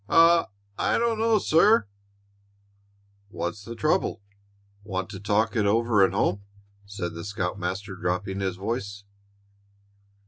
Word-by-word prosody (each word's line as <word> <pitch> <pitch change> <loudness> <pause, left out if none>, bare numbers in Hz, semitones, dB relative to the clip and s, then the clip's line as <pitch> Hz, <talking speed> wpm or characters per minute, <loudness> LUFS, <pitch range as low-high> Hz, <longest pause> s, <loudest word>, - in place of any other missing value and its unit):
"I 165 0 +5 0.5
don't 230 -1 0
know, 225 -1 +3
sir." 205 - +4 1.4
"What's 100 +1 -5
the 115 +3 -8
trouble? 100 -2 0 0.6
Want 95 0 -4
to 95 - -7
talk 105 +4 0
it 105 -3 +2
over 115 0 +3
at 95 - +3
home?" 100 0 0 0.5
said 95 -4 -5
the 85 0 -7
scoutmaster, 95 0 -4
dropping 95 +1 -2
his 95 -2 -2
voice. 100 0 -4
100 Hz, 115 wpm, -26 LUFS, 95-115 Hz, 1.4 s, I